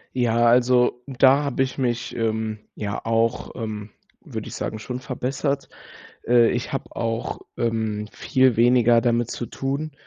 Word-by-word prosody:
Ja, 120 -2 +2
also, 125 0 +4
da 135 +1 +4
habe 135 -2 0
ich 130 -1 -5
mich, 125 -2 -2
ähm, 110 -1 -1 0.2
ja 100 -1 -4
auch, 115 +1 0
ähm, 110 -3 -5 0.3
würde - - -6
ich - - -7
sagen, 110 - -4
schon 125 +3 -5
verbessert. 140 +2 -3 0.6
Äh, 120 -1 +5
ich 120 0 -3
habe 135 - -5
auch, 115 -1 -3 0.2
ähm, 110 -2 -1
viel 130 -2 +2
weniger 120 0 +5
damit 120 -1 +1
zu 120 - -4
tun, 140 +5 -3
120 Hz, 150 wpm, -23 LUFS, 115-130 Hz, 0.6 s, Äh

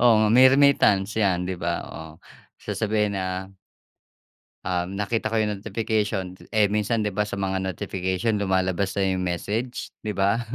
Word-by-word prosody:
Oo, 120 -1 +6
nga 110 0 +3
may 130 +3 +8
remittance 120 -7 +3
'yan, 95 -4 +2
'di 95 - -3
ba? 85 -1 -1 0.2
Oh, 80 +2 -8 0.5
sasabihin 105 -2 -1
na 95 0 -4 1.1
Um, 90 +1 -2
nakita 105 +2 -1
ko 115 - -2
yung 105 -2 -2
notification. 105 -3 -2
T - - -16
eh, 105 -2 +4
minsan, 105 +2 0
'di 105 - -1
ba, 105 +2 0
sa - - -4
mga 95 -1 -1
notification 95 +3 -2
lumalabas 95 -1 0
na 100 - +2
yung 95 0 -2
message, 105 +8 -3
'di 105 - -3
ba? 100 +4 +2
100 Hz, 165 wpm, -24 LUFS, 95-110 Hz, 1.1 s, may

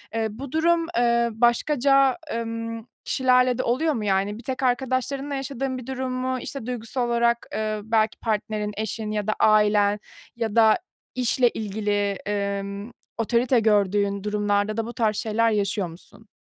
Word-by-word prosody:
ııı, 225 -1 +1
bu 260 +4 -8
durum, 330 +1 +2
ııı, 235 -1 +3
başkaca, 275 +2 +3 0.2
ımm, 230 0 -4 0.2
kişilerle 255 -1 +3
de - - -1
oluyor 305 +6 +1
mu, 215 -4 -3
yani, 200 +2 0
bir 235 - -11
tek 260 0 -4
arkadaşlarınla 265 +2 0
yaşadığın 270 -1 -3
bir 250 0 -9
durum 260 -1 -3
mu, 255 0 -1
işte, 275 -6 -6
duygusal 245 0 -3
olarak, 235 0 +1
ııı, 215 -1 -2
belki 220 -1 +1
partnerin, 210 -1 -2
eşin 220 0 -3
ya 210 -1 -2
da 215 - +2
ailen 210 -1 +4 0.4
ya 225 -2 -3
da 220 -1 +6 0.4
işle 250 0 +2
ilgili, 205 -2 -1 0.4
ımm, 200 +3 -6 0.3
otorite 235 +2 +2
gördüğün 200 -2 +2
durumlarda 205 0 0
da 225 - -1
bu 240 - -7
tarz 215 -3 +1
şeyler 225 +2 +1
yaşıyor 200 -2 0
musun? 195 +6 -14
230 Hz, 155 wpm, -24 LUFS, 210-255 Hz, 0.4 s, da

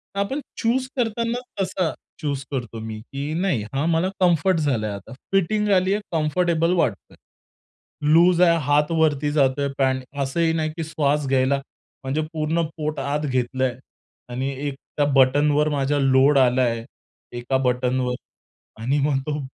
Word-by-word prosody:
तर - - -2
आपण 230 +9 -1 0.2
चूज 255 +3 0
करताना 235 0 -1 0.2
तसा 185 -3 -1 0.3
चूज 140 -3 -2
करतो 120 -4 -4
मी, 110 -1 -6
की 140 +6 -5
नाही, 175 - 0
हा 140 +3 0
मला 170 +2 +1
कम्फर्ट 180 0 +3
झालाय 125 -8 0
आता. 100 +5 -8 0.2
फिटिंग 205 +2 +1
आली 185 +1 +3
आहे, 210 - -1
कम्फर्टेबल 165 +1 +1
वाटतं 170 - -1
आहे. - - -19 1.0
लूज 175 +1 +5
आहे, 170 -2 +5
हात 150 +2 +2
वरती 150 -3 +1
जातोय, 140 -1 +2
पँट 130 -1 +1 0.2
असंही 160 +5 0
नाही 155 -1 0
की 165 - -2
श्वास 150 -2 0
घ्यायला 135 +1 +2 0.4
म्हणजे 135 +4 -1
पूर्ण 160 +1 0 0.2
पोट 155 -1 -3
आत 140 +2 -1
घेतलंय 130 -1 -1 0.5
आणि 130 +2 -2 0.2
एक 140 - -4 0.2
त्या 145 - +3
बटनवर 145 +3 +4
माझा 145 0 0
लोड 135 +1 +4
आलाय 125 -3 +2 0.5
एका 120 +2 0
बटनवर 125 0 0 0.7
आणि 135 +5 +1
मग 140 -2 +1
तो 150 0 -1
145 Hz, 150 wpm, -23 LUFS, 130-165 Hz, 1.0 s, लूज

